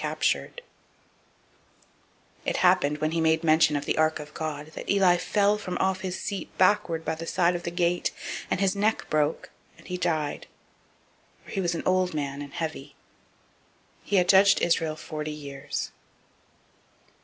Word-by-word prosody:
004:018 - - 0 2.0
It - - 0
happened, 180 -5 +3
when 155 +1 -1
he 165 0 0
made 160 0 +2
mention 155 -1 +4
of 145 0 -2
the - - 0
ark 155 0 +2
of 150 0 -9
God, 155 -1 -5
that - - -8
[Eli] 190 -3 +5
fell 205 +3 +2
from 185 -3 -4
off 190 0 0
his 185 -1 -4
seat 200 - -4
backward 185 -4 +2
by - - 0
the 165 +1 -7
side 175 0 +2
of 175 - -3
the 170 - -3
gate; 175 0 0 0.4
and - - 0
his 195 0 +2
neck 210 +2 +1
broke, 150 0 0 0.3
and - - -18
he 180 - -4
died: 155 -4 -2 1.0
for - - -12
he 195 - -1
was 175 -2 0
an - - -4
old 185 -2 +1
man, 140 -1 -3
and 140 -1 -9
heavy. 145 -4 -5 1.1
He 205 - -1
had 180 -2 +4
judged 195 +1 +6
Israel 165 -2 +1
forty 155 -1 -5
years. 145 -1 -5
165 Hz, 165 wpm, -26 LUFS, 155-185 Hz, 2.0 s, judged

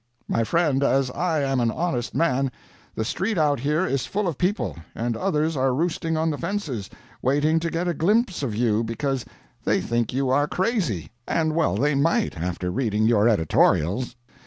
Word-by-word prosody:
My 115 - +1
friend, 150 +1 +1
as 135 -2 +2
I 165 -1 0
am 135 -1 +1
an 120 -1 +2
honest 125 -4 -2
man, 135 -4 +1 0.4
the 110 - -2
street 190 - -1
out 150 -4 +2
here 150 +7 +1
is 135 -7 -1
full 205 0 -1
of 170 - -1
people, 190 +4 0 0.2
and 115 0 -1
others 160 -2 0
are 130 -1 +1
roosting 165 +1 -1
on 160 0 +1
the 145 - -4
fences, 165 - -3 0.3
waiting 145 +5 +2
to 165 0 -2
get 170 +2 -2
a 175 - +1
glimpse 200 - +1
of 120 -7 -2
you, 115 -1 +2
because 130 +3 -2 0.4
they - - +2
think 115 -1 -1
you 130 +1 0
are 145 +2 +3
crazy. 180 - -1 0.2
And 160 -1 +1
well 160 - +1
they 145 +7 +2
might 165 - +1
after 90 +1 -3
reading 110 -1 0
your 110 0 +4
editorials. 100 +4 +2
140 Hz, 180 wpm, -24 LUFS, 120-165 Hz, 0.4 s, your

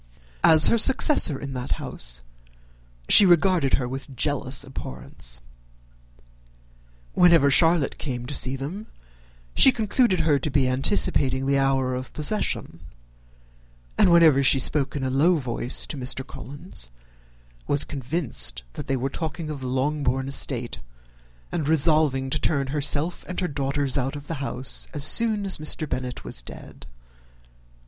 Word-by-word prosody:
As 155 -1 +6
her 230 - +3
successor 260 - +4
in 140 -1 -7
that 125 -1 -3
house, - - -6 0.8
she - - +9
regarded 175 -5 +3
her 125 - -3
with 135 +1 -8
jealous 140 -1 0
abhorrence. 65 - -6 1.7
Whenever 170 -5 +4
Charlotte 165 0 +3
came 125 -4 -5
to 140 - -6
see 130 -1 -1
them, 165 +11 -7 0.7
she 265 - +6
concluded 220 -3 +1
her 150 -3 +2
to 145 - -3
be 135 -2 +1
anticipating 130 +1 +2
the 140 0 +1
hour 135 -1 0
of 130 0 -6
possession; 185 +8 -2 1.2
and 175 - +3
whenever 160 -5 +5
she 135 0 +4
spoke 140 +2 -1
in 140 - -3
a 130 - -2
low 155 +7 +3
voice 125 -4 -2
to 150 - -6
Mr. 130 0 -3
Collins, 145 - -7 0.8
was 145 - +2
convinced 130 - -2
that - - -8
they 135 -1 -1
were 130 +2 -2
talking 155 +2 -5
of 145 - -6
the 130 - -6
Longbourn 135 0 -1
estate, 125 -3 -2 0.7
and 155 -4 -3
resolving 150 -4 +2
to 150 - -1
turn 140 -4 0
herself 150 +3 -1
and 180 - -5
her 180 - -1
daughters 140 -1 -1
out 135 +2 -3
of 145 0 -9
the 165 - -5
house 130 -1 -4
as 145 - -2
soon 220 +2 +4
as 190 - 0
Mr. 155 0 -2
Bennet 125 -2 -5
was - - -3
dead. - - -12
140 Hz, 145 wpm, -24 LUFS, 130-160 Hz, 1.7 s, she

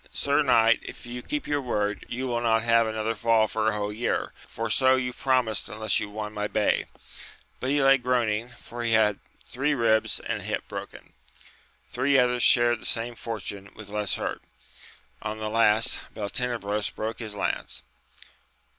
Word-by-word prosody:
Sir 140 +1 +2
knight, 115 -4 +4
if - - -10
you 120 +1 -6
keep 295 - -4
your 145 -1 0
word, 105 -5 -2
you 130 +2 -3
will 120 -2 -1
not 115 -1 +2
have 115 -1 +4
another 110 0 -1
fall 115 0 +3
for 110 0 0
a - - -1
whole 105 0 -2
year, 120 +3 -1
for 115 - -4
so 130 +3 +4
you 125 -1 -2
promised 125 -5 0
unless 110 +1 0
you 105 -2 -4
won 105 0 -5
my 105 0 -2
bay; 105 -1 +1 0.7
but 130 - -2
he 145 0 +2
lay 135 0 +6
groaning, 120 -2 0
for 120 0 -9
he 115 -1 0
had 105 -2 +3 0.3
three 145 +4 0
ribs 110 -3 +2
and - - -3
a - - -7
hip - - -3
broken. - - -8 0.7
Three 135 +2 +2
others 125 -1 +3
shared 120 -1 +4
the - - -9
same 120 +1 -1
fortune 105 -4 -6
with 110 -2 -11
less 105 -1 -1
hurt; - - -4 0.8
on 110 0 -4
the 110 0 -4
last, 110 -1 +3 0.2
Beltenebros 105 -1 -2
broke 110 +1 -4
his 110 -3 -6
lance. 100 - -3
115 Hz, 175 wpm, -26 LUFS, 110-125 Hz, 0.8 s, lay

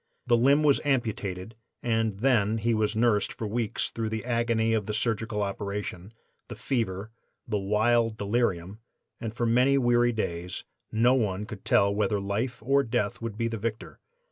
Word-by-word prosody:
The 120 - +4
limb 140 +5 +4
was 145 -2 +4
amputated 110 -7 -1 0.3
and 115 -3 0
then 115 -5 +3
he 115 +2 +1
was 110 0 0
nursed 110 -2 +2
for 115 - -5
weeks 110 0 -2
through 115 -1 -3
the 110 0 -4
agony 115 -2 +1
of 110 -3 0
the 105 - -2
surgical 110 -1 -1
operation, 100 -1 -4 0.4
the - - -7
fever, 110 -4 -2 0.4
the 105 -3 0
wild 110 +3 +2
delirium; 100 -3 -1 0.4
and 115 - -4
for 120 +2 -2
many 125 +4 +4
weary 120 -1 +3
days 90 -5 -4 0.3
no 120 +3 +4
one 105 -5 0
could 105 -3 -9
tell 100 0 +3
whether 105 0 +1
life 105 +5 -3
or 140 +4 +3
death 120 -1 -2
would 115 -2 -5
be 115 0 0
the 115 -1 -4
victor. 110 +1 -5
110 Hz, 170 wpm, -27 LUFS, 105-120 Hz, 0.4 s, The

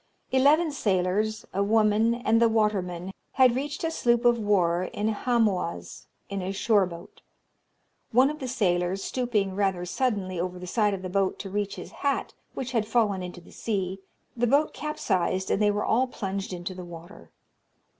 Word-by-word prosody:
Eleven 295 +5 +4
sailors, 205 -2 0
a 195 - 0
woman, 215 +2 +3
and 230 -1 +2
the 230 - +5
waterman, 190 -5 0 0.2
had 255 -2 +5
reached 290 +4 -3
a 325 - 0
sloop 240 -5 +1
of 240 -1 +5
war 185 -4 +2
in 210 +1 0
Hamoaze 215 -6 -1 0.2
in 200 -1 -4
a 185 +1 -3
shore 200 -1 +2
boat. 170 -1 -11 0.9
One 255 +4 +5
of 305 - -8
the 260 - -4
sailors, 190 -5 0
stooping 220 -7 -1
rather 190 -2 0
suddenly 190 -4 -1
over 180 +1 -3
the 180 - -8
side 210 +2 +1
of 190 - -9
the 185 - -4
boat 195 0 +1
to 195 - -7
reach 205 0 -2
his - - -9
hat, 280 -1 -2 0.2
which 255 -2 -4
had 225 -4 0
fallen 210 -5 +1
into 180 -1 -7
the - - -17
sea, 195 -3 -3 0.4
the 240 0 +1
boat 285 +5 +3
capsized, 190 - -1
and 200 - +1
they 210 - +4
were 205 0 0
all 255 +4 +2
plunged 195 -5 -4
into 180 +1 -5
the 180 0 -8
water. 175 +2 -11
205 Hz, 175 wpm, -27 LUFS, 185-240 Hz, 0.9 s, the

